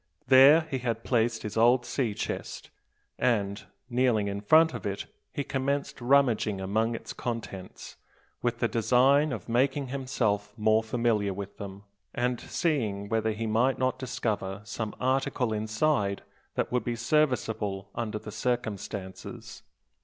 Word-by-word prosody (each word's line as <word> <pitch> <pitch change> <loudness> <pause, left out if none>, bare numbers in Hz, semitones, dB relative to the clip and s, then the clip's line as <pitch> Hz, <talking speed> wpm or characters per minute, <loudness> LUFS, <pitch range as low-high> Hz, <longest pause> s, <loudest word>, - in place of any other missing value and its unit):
There 135 +4 +8
he 155 -5 -4
had 115 -2 -2
placed 115 -2 +1
his 105 0 -5
old 120 +2 +4
sea 120 -7 -1
chest; - - -5 0.5
and, 100 -4 +1 0.2
kneeling 120 -4 +2
in 100 0 -3
front 160 +9 +5
of - - -6
it, 100 0 -3 0.3
he 140 - -3
commenced 140 +1 -2
rummaging 120 -6 +3
among 110 +5 0
its - - -7
contents, 115 -6 -6 0.4
with 120 -1 0
the 120 - +1
design 130 +6 +3
of 110 -8 -5
making 135 +3 +1
himself 110 -6 -1
more 110 0 +3
familiar 110 -4 0
with 100 0 -7
them, 100 0 -8 0.3
and 125 0 0
seeing 110 - -1
whether 110 0 +1
he 110 +1 -3
might 115 +5 +2
not 130 0 0
discover 110 -7 -3
some 105 +1 -5
article 130 -2 0
inside 110 0 0 0.3
that - - -1
would 125 0 +1
be 120 - -2
serviceable 110 -7 0
under 110 -2 -3
the 105 - -8
circumstances. 105 -5 -4
115 Hz, 140 wpm, -28 LUFS, 105-130 Hz, 0.5 s, There